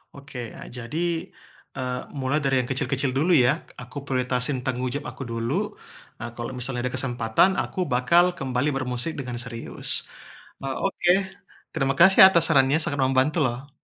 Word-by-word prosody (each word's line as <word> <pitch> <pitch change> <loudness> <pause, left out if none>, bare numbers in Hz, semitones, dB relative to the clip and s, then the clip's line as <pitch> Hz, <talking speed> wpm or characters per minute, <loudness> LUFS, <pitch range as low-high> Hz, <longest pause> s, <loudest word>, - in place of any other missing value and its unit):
Oke, 140 -2 -9 0.2
a - - -9
jadi, 125 +6 -6 0.8
eee, 125 -1 -3 0.2
mulai 135 +2 0
dari 135 -2 +1
yang 125 - -8
kecil-kecil 135 0 -1
dulu 165 +6 +2
ya, 125 -2 +5 0.3
aku 125 +3 -12
prioritasin 125 0 -1
tanggung 130 -1 -2
jawab 145 0 -4
aku 135 - -8
dulu, 115 +3 -2 0.7
e - - -7
kalo 120 - -5
misalnya 125 0 -3
ada 125 - -4
kesempatan 120 +4 +2
aku - - -4
bakal 170 +9 +4
kembali 130 +2 -1
bermusik 130 +3 -3
dengan 125 -2 -5
serius. 115 -2 -4 0.6
E - - -3 0.2
oke, 195 -2 +2 0.6
terima 135 0 0
kasih 190 +3 +7
atas 170 -4 +3
sarannya 135 +2 +4
sangat 145 -5 -2
membantu 135 +5 +2
loh. 125 +4 -4
130 Hz, 155 wpm, -25 LUFS, 125-145 Hz, 0.8 s, kasih